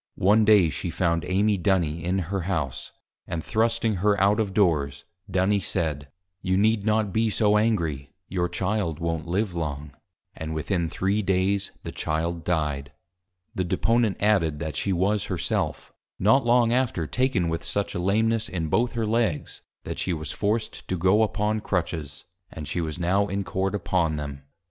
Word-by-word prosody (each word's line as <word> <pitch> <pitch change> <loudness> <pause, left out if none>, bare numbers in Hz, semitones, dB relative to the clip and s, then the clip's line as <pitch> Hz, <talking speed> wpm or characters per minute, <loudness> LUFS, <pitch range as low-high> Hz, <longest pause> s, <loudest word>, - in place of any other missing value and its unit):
One 105 +3 +4
Day 100 -7 +5
she - - -3
found 85 -3 0
Amy 100 +2 +2
Duny 85 -4 +1
in 90 +2 0 0.2
her 95 - 0
House, 75 -9 -2 0.4
and 80 -2 -3
thrusting 115 -1 +1
her 100 +2 +2
out 100 +3 +3
of 105 -3 0
Doors, 80 -9 +1 0.2
Duny 95 +2 +2
said, 80 -5 -2 0.3
You 95 0 +1
need 105 +1 +3
not 105 -3 +1
be 110 0 +2
so 105 0 +2
Angry, 85 -11 0 0.2
your 90 -1 -1
Child 95 -5 -1
won't 80 -1 -3
live 95 +2 0
long. 75 -3 -4 0.4
And 80 0 -5
within 85 +1 -1
three 100 +5 0
Days 95 +1 +1
the - - -5
Child 80 +2 -2
Died. 75 -5 -1 0.6
The 95 - -1
Deponent 115 +4 +1
added, 95 -8 +2
that 80 -2 -4
she 100 - -1
was 95 +3 +1
Her - - -3
self, - - -2 0.2
not 110 +8 +4
long 120 -1 +4
after 120 -10 0
taken 125 - +1
with 80 0 -2
such 100 -1 -2
a - - -3
Lameness, 110 +4 +1
in 80 -4 -3
both 120 +8 +1
her 115 -1 -1
Legs, 110 -7 -1 0.2
that - - -5
she 90 - -1
was 80 -3 -4
forced 110 +2 -2
to 95 - -1
go 95 +5 +4
upon 110 0 +1
Crutches; 80 -7 -3 0.3
and 75 -2 -7
she 85 +3 -2
was 80 -2 -4
now 95 +4 +1
in 100 0 -2
Court 95 +1 -1
upon 85 -4 0
them. 70 -2 -6
95 Hz, 170 wpm, -25 LUFS, 80-105 Hz, 0.6 s, Day